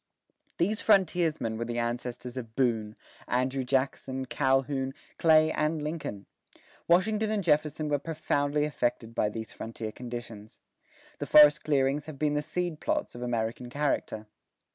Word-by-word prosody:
These 210 +5 0
frontiersmen 170 - +2
were 115 - -2
the 120 0 -4
ancestors 120 +1 -3
of 115 -3 -7
Boone, 110 -5 0 0.3
Andrew 130 +2 0
Jackson, 130 0 -1
Calhoun, 135 0 0 0.2
Clay, 155 -1 +5
and 155 +1 0
Lincoln. 150 -10 -5 0.6
Washington 210 +5 +3
and 215 -2 0
Jefferson 150 -1 +1
were 145 -1 +1
profoundly 145 -1 0
affected 120 -5 -2
by 105 - +1
these 110 +1 -6
frontier 110 -1 -6
conditions. 120 -3 -8 0.6
The - - -4
forest 150 -1 +7
clearings 140 0 +1
have 155 -2 -8
been 150 +1 +1
the 150 - +1
seed 175 0 -3
plots - - -1
of 120 - -9
American 120 0 -2
character. 135 -6 -1
135 Hz, 140 wpm, -29 LUFS, 120-155 Hz, 0.6 s, forest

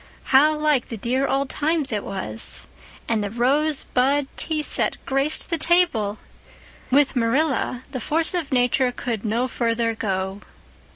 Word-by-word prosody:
How 300 +4 +6
like 300 -4 +1
the 230 - -5
dear 255 +6 0
old 275 +1 0
times 300 0 0
it 210 -2 -2
was! 185 - -4 0.4
And 220 -2 0
the 205 - -3
rose 275 +7 +1
bud 275 +3 +1
tea 310 -2 -1
set - - 0
graced 275 +6 +2
the 335 - 0
table! 300 - +2 0.7
With 275 +1 +3
Marilla 255 +1 0
the 260 - -4
force 320 +8 +1
of 340 -6 -2
nature 250 0 +2
could 235 -3 -4
no 230 +3 0
further 230 -2 0
go. 195 -2 -3
260 Hz, 150 wpm, -23 LUFS, 230-295 Hz, 0.7 s, How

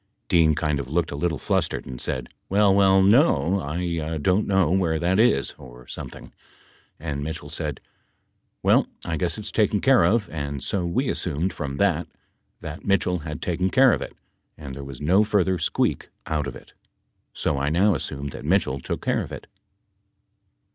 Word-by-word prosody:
Dean 80 -5 +4
kind 75 +1 0
of 65 -2 -5
looked 85 +3 0
a - - -4
little 80 +1 -1
flustered - - -1
and 65 -1 -6
said, 65 -1 -3 0.2
"Well, 100 0 +4
well, 95 -1 +5
no. 100 - +4
I 80 0 -3
don't 90 +7 +1
know 95 -5 +3
where 90 -4 +2
that 90 +4 +1
is 70 - +3
or - - -13
something," - - -9 0.7
and 75 -3 -4
Mitchell 80 -1 -5
said, 75 -3 -3 0.8
"Well - - +4 0.2
I 80 - -2
guess 90 +4 -1
it's 105 - -5
taken 105 -1 +2
care 130 -5 +5
of." 105 +4 +2
And 70 -4 -4
so 90 -3 -1
we 125 +10 0
assumed 90 - -1
from 70 -3 -5
that 90 -3 +1 0.5
that - - -7
Mitchell 90 -2 +1
had 75 -1 -6
taken 90 +2 0
care 130 +4 +5
of - - -1
it, - - -7 0.4
and 70 -3 -8
there 70 +1 -7
was 70 -1 -9
no 90 +8 +4
further 95 -4 +1
squeak - - 0 0.2
out 75 -2 -1
of 65 - -6
it - - -14 0.6
so 70 - -1
I 70 +1 0
now 95 +6 +3
assume 70 +1 -4
that - - -9
Mitchell 75 -5 +1
took - - -5
care - - +1
of - - -7
it. - - -8
85 Hz, 180 wpm, -24 LUFS, 70-95 Hz, 0.8 s, well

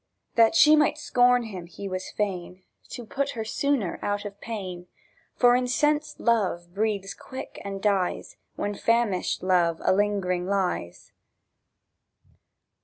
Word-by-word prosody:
(That 230 +6 +4
she 305 -1 +7
might 300 0 +3
scorn 245 -4 +3
him 190 -6 -7 0.2
was 185 -2 -4
he - - -12
fain, 185 -3 -3 0.3
To 240 - -7
put 275 +5 -2
her 220 - -3
sooner 245 -5 -1
out 205 0 -2
of 200 0 -8
pain; 185 -6 -6 0.5
For 245 -1 +5
incensed 295 +4 0
love 185 -7 0
breathes 200 -2 -1
quick 260 - -9
and 195 -1 -6
dies, 195 -4 0 0.2
When 205 0 -2
famished 225 -4 0
love 175 -3 +2
a - - +4
lingering 190 -3 0
lies.) 190 - -2
205 Hz, 130 wpm, -26 LUFS, 185-245 Hz, 0.5 s, she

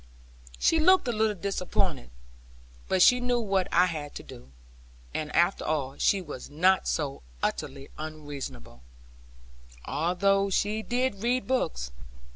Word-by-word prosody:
She 325 - +3
looked 370 -2 +5
a - - +2
little 215 -1 +1
disappointed, 180 - -1 0.8
but 185 -1 +4
she 250 - +6
knew 245 0 +1
what 195 -5 0
I 180 +2 +5
had 155 -5 -5
to - - -7
do; 60 +2 -12 0.6
and 150 -1 -3
after 175 +3 +3
all 140 -3 -1
she 195 - +3
was 145 -6 -8
not 185 +6 +3
so 140 - -2 0.2
utterly 135 +1 -3
unreasonable; 145 - -7 1.0
although 195 +5 +1
she 210 +3 0
did 245 -3 -1
read 245 +2 +1
books. 60 - -1
185 Hz, 130 wpm, -28 LUFS, 145-220 Hz, 1.0 s, she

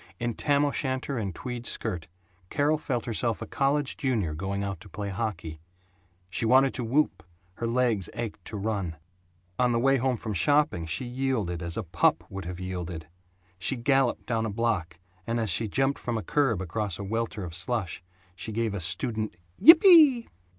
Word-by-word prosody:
In 120 0 -1
tam 145 +4 +2
o'shanter 130 -2 -1
and 95 -5 -4
tweed 125 -1 -5
skirt 90 -8 -3 0.4
Carol 150 +2 +1
felt 130 -6 -2
herself 115 -1 -1
a - - -5
college 140 0 0
junior 110 - 0
going 95 +5 -3
out 100 -3 -4
to 100 +2 -13
play 100 +3 -5
hockey. 95 -7 -4 0.7
She - - 0
wanted 130 +3 +5
to 125 - -3
whoop, 130 - +1 0.4
her 115 - -2
legs 115 -6 +1
ached 115 -2 -5
to 105 - -5
run. 100 -5 -2 0.6
On 125 -1 +3
the 115 - +2
way 135 +2 +4
home 130 -1 0
from 110 -1 -4
shopping 125 - +2
she 80 +10 -2
yielded, 120 -9 -2
as 85 -1 -4
a - - -1
pup 85 -1 +2
would 95 -2 -6
have 90 0 -6
yielded. 90 -3 -5 0.5
She 90 +9 0
galloped 135 +1 +1
down 115 -2 0
a - - -3
block 100 -6 -1 0.3
and 115 +1 0
as 110 -4 0
she 110 +7 0
jumped 135 +6 0
from 120 -2 -2
a 110 - -4
curb 115 - +1
across 100 0 -3
a - - -6
welter 110 0 -3
of 85 -2 -6
slush, 95 +1 -2 0.3
she 110 - -6
gave 115 -1 -1
a 100 - -3
student 110 +4 -1 0.3
"Yippee!" 320 - +8
115 Hz, 180 wpm, -27 LUFS, 95-130 Hz, 0.7 s, Yippee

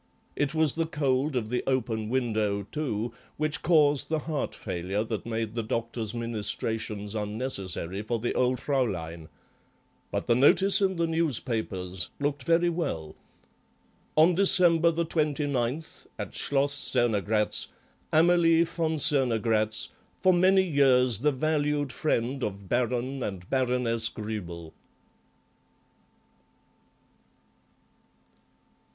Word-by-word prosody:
It 145 +1 -1
was 160 -2 +5
the 165 0 -1
cold 140 -2 0
of 110 -3 -2
the 125 +1 -1
open 115 -5 -1
window, 110 -5 -1
too, 115 -2 -4 0.2
which 155 0 -1
caused 150 -4 +3
the 160 - +1
heart 155 -3 -3
failure 95 +4 -3
that 110 0 -5
made 110 -1 -3
the 115 - -2
doctor's 115 0 -3
ministrations 110 -2 -2
unnecessary 105 -4 -3
for 115 +2 -2
the 120 +2 -2
old 125 0 +1
Fraulein. 85 - -2 0.8
But - - -3
the - - +3
notice 190 +11 +4
in 190 -1 +1
the 170 0 0
newspapers 110 - -2
looked 145 -1 -2
very 170 +1 +3
well— 80 - -3 1.0
"On 160 +3 +5
December 170 -3 +4
29th, 150 -4 -2
at - - -6
Schloss 140 0 0
Cernogratz, 110 -6 +1 0.4
Amalie 165 0 +4
von 165 -1 -2
Cernogratz, 115 -7 +3 0.3
for 185 - +4
many 190 +2 +4
years 130 - +3
the 150 +4 +2
valued 145 -1 -1
friend 130 -1 -1
of 100 -1 -5
Baron 125 +4 -1
and 95 -5 -5
Baroness 125 -3 0
Gruebel." 85 -7 -7
125 Hz, 110 wpm, -27 LUFS, 110-155 Hz, 1.0 s, was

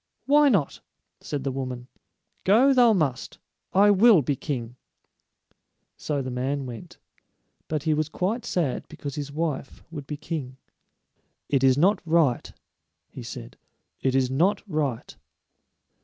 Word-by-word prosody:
"Why 290 +1 +5
not?" 185 - 0 0.4
said 145 -3 -5
the 135 - -1
woman. 130 -2 -5 0.6
"Go 240 +8 +5
thou 245 -3 +6
must. 150 - -1 0.3
I 205 +2 +5
will 205 - +6
be 140 +3 0
king." 125 -4 -5 1.2
So 145 -3 -3
the 130 - -5
man 135 +3 -2
went; 120 -3 -9 0.7
but 155 -2 -2
he 160 -1 +2
was 155 0 -1
quite 200 +9 -2
sad 155 -8 -2
because 140 -1 -7
his 145 -1 -5
wife 150 -3 -4
would 145 -4 -8
be 150 - -5
king. 145 -4 -5 0.9
"It 135 -2 +1
is 130 0 +5
not 190 +6 +3
right," 160 -7 +1 0.6
he - - -9
said; - - -9 0.4
"it 130 -1 0
is 130 -1 +2
not 185 +9 +1
right." 145 - -3
150 Hz, 140 wpm, -25 LUFS, 135-185 Hz, 1.2 s, thou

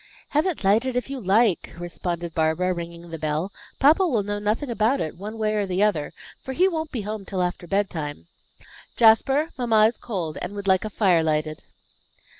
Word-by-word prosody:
"Have 300 +5 +2
it 355 - -3
lighted 225 +6 +2
if 250 +2 -2
you 275 - -4
like," 205 -1 +2
responded 175 -1 -4
Barbara, 160 +3 +1
ringing 170 0 -8
the 165 - -6
bell. 155 +5 -2 0.3
"Papa 315 +7 +5
will 235 -10 +1
know 205 +1 -3
nothing 220 +6 -1
about 230 +4 +1
it, 155 - -3
one 210 +5 -7
way 215 -1 0
or 205 -2 0
the 185 +2 +1
other, 175 -9 +1 0.3
for 265 - -6
he 365 +8 +4
won't 320 -4 -3
be 240 - -3
home 210 0 -5
till 190 -1 -2
after 175 0 -3
bedtime. 165 - -2 0.7
Jasper, 270 +8 +4
mamma 225 -3 +4
is 230 +2 0
cold, 175 -9 -4
and 180 +3 -5
would 200 -1 -5
like 190 -1 +3
a - - -3
fire 190 -5 +3
lighted." 155 -1 -1
205 Hz, 195 wpm, -24 LUFS, 175-235 Hz, 0.7 s, Papa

